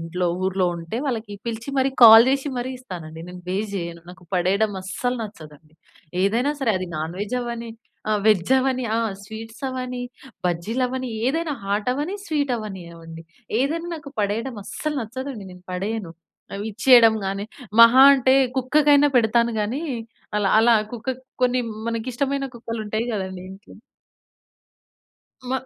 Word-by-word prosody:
ఇంట్లో, 175 Hz, +2 st, -2 dB, 0.2 s
ఊర్లో 190 Hz, 0 st, +1 dB
ఉంటే 165 Hz, +7 st, -6 dB
వాళ్ళకి 225 Hz, -5 st, -3 dB
పిలిచి 230 Hz, +3 st, -5 dB
మరి 265 Hz, +1 st, +2 dB
కాల్ 225 Hz, 0 st, +11 dB
జేసి 275 Hz, +2 st, 0 dB
మరి 245 Hz, +1 st, -3 dB
ఇస్తానండి. 165 Hz, -9 st, -8 dB
నేను 180 Hz, 0 st, -9 dB
వేస్ట్ 200 Hz, +3 st, -2 dB
జేయను. 170 Hz, -1 st, -5 dB
నాకు 180 Hz, 0 st, -13 dB
పడేయడం 200 Hz, +4 st, +2 dB
అస్సలు 245 Hz, +7 st, -2 dB
నచ్చదండి. 155 Hz, -6 st, -11 dB, 0.5 s
ఏదైనా 235 Hz, +8 st, +2 dB
సరే 255 Hz, -5 st, +1 dB
అది 185 Hz, -, -4 dB
నాన్ 160 Hz, +3 st, -4 dB
వెజ్ 210 Hz, +4 st, -3 dB
అవ్వని, 235 Hz, -1 st, -5 dB, 0.4 s
ఆహ్, 210 Hz, -1 st, +1 dB
వెజ్ 210 Hz, +2 st, +3 dB
అవ్వని, 255 Hz, -1 st, 0 dB
ఆహ్, 230 Hz, -1 st, +1 dB
స్వీట్సవ్వని, 250 Hz, +4 st, -6 dB, 0.4 s
బజ్జీలవని, 250 Hz, +9 st, -1 dB, 0.2 s
ఏదైనా 320 Hz, 0 st, -1 dB
హాటవ్వని, 250 Hz, -, -1 dB
స్వీటవ్వనివ్వండి, 190 Hz, -, -4 dB, 0.4 s
ఏదైనా 330 Hz, +5 st, -1 dB
నాకు 290 Hz, -3 st, -9 dB
పడేయడం 220 Hz, +4 st, -2 dB
అస్సలు 305 Hz, -1 st, -4 dB
నచ్చదండి. 245 Hz, -2 st, -6 dB
నేను 180 Hz, 0 st, -15 dB
పడేయను. 195 Hz, -1 st, -3 dB, 0.4 s
అవి 200 Hz, +1 st, -4 dB
ఇచ్చేయడం 230 Hz, +1 st, +6 dB
గానీ 195 Hz, +1 st, -3 dB, 0.4 s
మహా 250 Hz, +3 st, +8 dB
అంటే 260 Hz, 0 st, +3 dB, 0.2 s
కుక్కకైనా 290 Hz, +2 st, +4 dB
పెడతాను 235 Hz, 0 st, +3 dB
గానీ 240 Hz, +9 st, -2 dB, 0.5 s
అలా 200 Hz, -2 st, +2 dB
అలా 230 Hz, +1 st, +5 dB, 0.2 s
కుక్కక్ 250 Hz, +2 st, -4 dB, 0.2 s
కొన్ని 250 Hz, 0 st, +3 dB, 0.3 s
మనకిష్టమైన 260 Hz, +4 st, -2 dB
కుక్కలుంటాయి 225 Hz, -1 st, -3 dB
గదండీ 190 Hz, -2 st, -5 dB
ఇంట్లో. 195 Hz, +3 st, -13 dB, 1.8 s
మ -, -, 0 dB
225 Hz, 130 wpm, -23 LUFS, 195-255 Hz, 1.8 s, కాల్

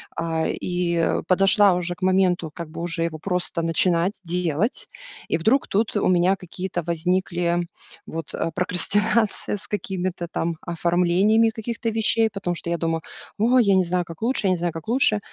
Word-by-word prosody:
А, 165 Hz, -1 st, -1 dB
и 175 Hz, -2 st, 0 dB
подошла 195 Hz, +1 st, +5 dB
уже 175 Hz, 0 st, -2 dB
к 180 Hz, -, -11 dB
моменту, 185 Hz, -3 st, +2 dB
как 170 Hz, -1 st, -7 dB
бы 155 Hz, -, -9 dB
уже 170 Hz, -1 st, -2 dB
его 165 Hz, -1 st, -2 dB
просто 180 Hz, 0 st, -2 dB
начинать 170 Hz, +3 st, +1 dB
делать. 175 Hz, -, -1 dB, 0.4 s
И -, -, +2 dB
вдруг 225 Hz, +11 st, +2 dB
тут 215 Hz, +3 st, 0 dB
у 205 Hz, -, +1 dB
меня 185 Hz, +1 st, +3 dB
какие-то 180 Hz, -1 st, -5 dB
возникли 175 Hz, +1 st, 0 dB, 0.5 s
вот, 165 Hz, -1 st, -6 dB
э, 165 Hz, -, -2 dB
прокрастинация 205 Hz, +5 st, +1 dB
с -, -, -8 dB
какими-то 185 Hz, -3 st, -3 dB
там 165 Hz, 0 st, -2 dB
оформлениями 180 Hz, +6 st, +2 dB
каких-то 230 Hz, +1 st, -4 dB
вещей, 225 Hz, 0 st, +2 dB
потому 195 Hz, -3 st, -3 dB
что 170 Hz, -, -5 dB
я 170 Hz, -, 0 dB
думаю: 165 Hz, -1 st, -1 dB, 0.4 s
"О, 240 Hz, +4 st, +4 dB
я 210 Hz, -6 st, +4 dB
не 190 Hz, -, +4 dB
знаю, 180 Hz, 0 st, -1 dB
как 165 Hz, -1 st, -11 dB
лучше. 235 Hz, -1 st, 0 dB
Я -, -, +3 dB
не 185 Hz, -, +1 dB
знаю, 170 Hz, -1 st, -2 dB
как 165 Hz, +3 st, -8 dB
лучше". 230 Hz, -3 st, +2 dB
180 Hz, 170 wpm, -23 LUFS, 170-205 Hz, 0.5 s, подошла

